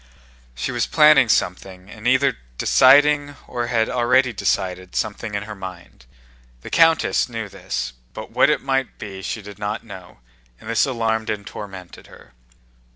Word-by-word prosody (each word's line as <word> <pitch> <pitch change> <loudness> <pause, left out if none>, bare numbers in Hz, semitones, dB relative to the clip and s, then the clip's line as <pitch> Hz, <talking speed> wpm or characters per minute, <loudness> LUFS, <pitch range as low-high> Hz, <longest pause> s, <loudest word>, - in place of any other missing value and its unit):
She 65 - -3
was 120 -1 -1
planning 150 -5 +5
something 90 0 -1
and 110 +2 -7
either 130 +2 +3 0.2
deciding 145 +2 +4
or 120 -1 -4
had 115 -2 +1
already 125 +1 +2
decided 95 -3 -2
something 105 0 -3
in 100 - -2
her 105 0 -8
mind. 95 -10 -11 0.5
The - - -10
countess 165 -5 +3
knew 115 -3 -5
this, 65 -9 -5 0.2
but - - -8
what - - +4
it - - +1
might 135 -1 -1
be 95 -2 -8
she 110 +3 -5
did 105 0 -11
not 105 +1 -3
know, 95 - -12 0.4
and - - -14
this 115 - +2
alarmed 115 -3 -1
and 100 -1 -3
tormented 95 -4 -10
her. - - -17
110 Hz, 160 wpm, -21 LUFS, 95-130 Hz, 0.5 s, planning